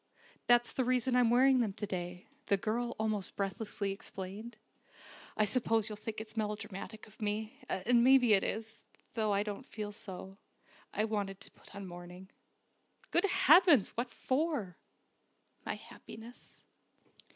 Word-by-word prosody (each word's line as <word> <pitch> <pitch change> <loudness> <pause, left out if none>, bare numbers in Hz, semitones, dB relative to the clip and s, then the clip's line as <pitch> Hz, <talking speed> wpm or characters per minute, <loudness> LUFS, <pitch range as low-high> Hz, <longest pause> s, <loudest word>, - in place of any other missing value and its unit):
That's 240 0 +5
the 260 - 0
reason 250 0 +1
I'm 245 -2 +5
wearing 260 +2 +5
them 220 -5 +1
to 210 +1 -4
day," 180 -2 -5 0.2
the 200 - +4
girl 235 +4 -1
almost 215 -3 -1
breathlessly 200 0 -2
explained. 195 +3 -7 0.8
"I 215 - +4
suppose 225 -1 +2
you'll 210 - -5
think 215 +1 -6
it's 220 0 -8
melodramatic 215 0 -4
of 215 +1 -18
me, 215 +1 -2
and 235 +5 +3
maybe 250 -3 +6
it 195 - +4
is, 220 +1 -5 0.3
though 220 -2 +1
I 200 0 +2
don't 210 +4 -5
feel 210 -4 -6
so. 195 -1 -8 0.5
I 215 - 0
wanted 200 -3 -2
to - - -10
put - - -17
on 200 -1 -6
mourning." 180 +1 -10 0.8
"Good - - +4
heavens! 335 - +6
What 240 +2 -3
for?" 260 - -1 0.9
"My - - -1
happiness." 230 +3 -12
215 Hz, 145 wpm, -33 LUFS, 200-240 Hz, 0.9 s, maybe